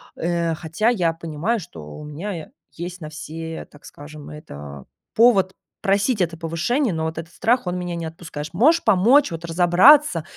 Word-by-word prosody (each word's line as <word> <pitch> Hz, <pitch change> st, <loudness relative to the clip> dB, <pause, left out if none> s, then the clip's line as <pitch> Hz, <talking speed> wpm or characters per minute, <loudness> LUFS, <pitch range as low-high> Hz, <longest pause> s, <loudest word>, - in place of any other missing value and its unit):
э, 170 Hz, -1 st, -1 dB
хотя 165 Hz, +8 st, 0 dB
я 175 Hz, -8 st, +1 dB
понимаю, 165 Hz, +7 st, -2 dB
что 170 Hz, -, -10 dB
у -, -, -9 dB
меня 165 Hz, +2 st, -6 dB, 0.2 s
есть 175 Hz, +1 st, -7 dB
на 155 Hz, -, -6 dB
все, 160 Hz, +1 st, -7 dB
так 145 Hz, -, -18 dB
скажем, 145 Hz, 0 st, -11 dB
это 70 Hz, -, -10 dB, 0.3 s
повод 200 Hz, -5 st, +4 dB, 0.3 s
просить 200 Hz, +2 st, +1 dB
это 165 Hz, -2 st, -1 dB
повышение, 175 Hz, -, -1 dB
но 160 Hz, 0 st, -2 dB
вот 160 Hz, 0 st, -4 dB
этот 165 Hz, +1 st, -7 dB
страх- 240 Hz, -1 st, +1 dB
он 180 Hz, 0 st, -1 dB
меня 175 Hz, -1 st, -4 dB
не 165 Hz, -1 st, -4 dB
отпускаешь. 160 Hz, -2 st, -8 dB
Можешь 290 Hz, -, +4 dB
помочь 220 Hz, +6 st, +4 dB
вот 165 Hz, 0 st, -6 dB
разобраться, 175 Hz, -, +5 dB
170 Hz, 170 wpm, -22 LUFS, 160-200 Hz, 0.3 s, разобраться